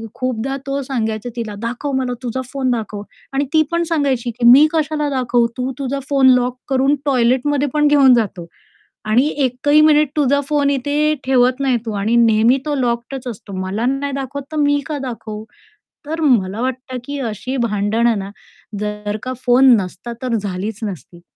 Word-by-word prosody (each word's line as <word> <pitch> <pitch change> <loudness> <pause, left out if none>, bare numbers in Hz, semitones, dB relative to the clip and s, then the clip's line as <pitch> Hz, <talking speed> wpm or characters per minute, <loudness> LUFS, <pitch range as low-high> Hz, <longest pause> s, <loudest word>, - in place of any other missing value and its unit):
खूपदा 255 +1 -2
तो 275 +1 -1
सांगायचा 225 -3 -3
तिला, 225 -3 -4
"दाखव 245 +5 -4
मला 255 -1 -1
तुझा 250 +1 -3
फोन 265 -2 -1
दाखव." 215 -3 -3 0.3
आणि 275 +1 0
ती 315 - +5
पण 340 0 +1
सांगायची, 270 -6 0
की 235 +1 -3
"मी 275 +5 +8
कशाला 305 -2 0
दाखवू? 250 -3 +1
तू 255 +1 -2
तुझा 275 0 -2
फोन 270 -2 +5
लॉक 250 0 -1
करून 270 +2 +2
टॉयलेटमध्ये 270 +2 +2
पण 300 0 +3
घेऊन 280 -3 +6
जातो 190 -7 -2 0.6
आणि 240 +7 +3 0.2
एकही 290 +4 +3
मिनिट 305 -1 +4
तुझा 285 -1 +2
फोन 290 -1 +2
इथे 290 +3 +1
ठेवत 255 0 +3
नाही 260 -3 +2
तू 220 - -3
आणि 220 +4 +1
नेहमी 230 +1 +4
तो 295 -1 -1
लॉक्डच 245 0 -2
असतो. 205 -3 -8
मला 195 +5 -2
नाही 275 +2 -1
दाखवत 275 +1 -5
तर 310 - -4
मी 290 0 +3
का 305 -2 -3
दाखवू?" 220 -4 -6 0.6
तर 320 +2 -3
मला 225 -8 +2
वाटतं, 255 0 -4
की 285 0 -5
अशी 250 +2 -4
भांडणं 225 0 +1
ना 195 - -6 0.5
जर 210 0 -3
का 255 0 -3
फोन 250 0 +6
नसता 190 +6 -7
तर 255 -2 -2
झालीच 200 +2 -4
नसती. 175 - -7
255 Hz, 170 wpm, -18 LUFS, 225-280 Hz, 0.6 s, मी